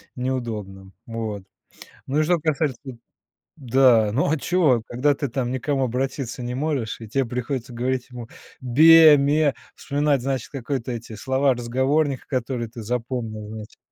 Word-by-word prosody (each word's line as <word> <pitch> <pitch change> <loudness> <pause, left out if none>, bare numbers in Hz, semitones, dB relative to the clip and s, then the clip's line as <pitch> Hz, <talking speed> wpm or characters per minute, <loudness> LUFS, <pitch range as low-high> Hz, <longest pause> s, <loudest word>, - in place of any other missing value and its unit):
неудобно. 110 -7 -4
Вот. 110 -4 -5 0.6
Ну 140 +3 0
и - - +3
что 175 +1 +2
касается 150 -4 -1 0.8
да, 125 -4 +4
ну 140 +3 +1
а 160 - +1
чё, 140 -6 +2
когда 140 +4 +1
ты 140 -2 -3
там 125 0 -2
ни 130 - -1
к 125 - -12
кому 135 -3 0
обратиться 130 0 -3
не 120 +1 -4
можешь, 135 -6 -2
и 110 - -8
тебе 135 +5 0
приходится 125 +1 -4
говорить 125 +1 -2
ему 120 -2 -8 0.3
бе 155 +4 +7
ме, 145 +1 +2 0.2
вспоминать, 145 -2 0
значит, 130 -1 -3
какой-то 130 -2 -4
эти 115 -1 -7
слова 130 +4 +1
разговорника, 130 +4 0
которые 125 -3 -3
ты 115 -2 -9
запомнил, 115 -2 -4
значит, 110 -1 -9
130 Hz, 155 wpm, -23 LUFS, 115-140 Hz, 0.8 s, бе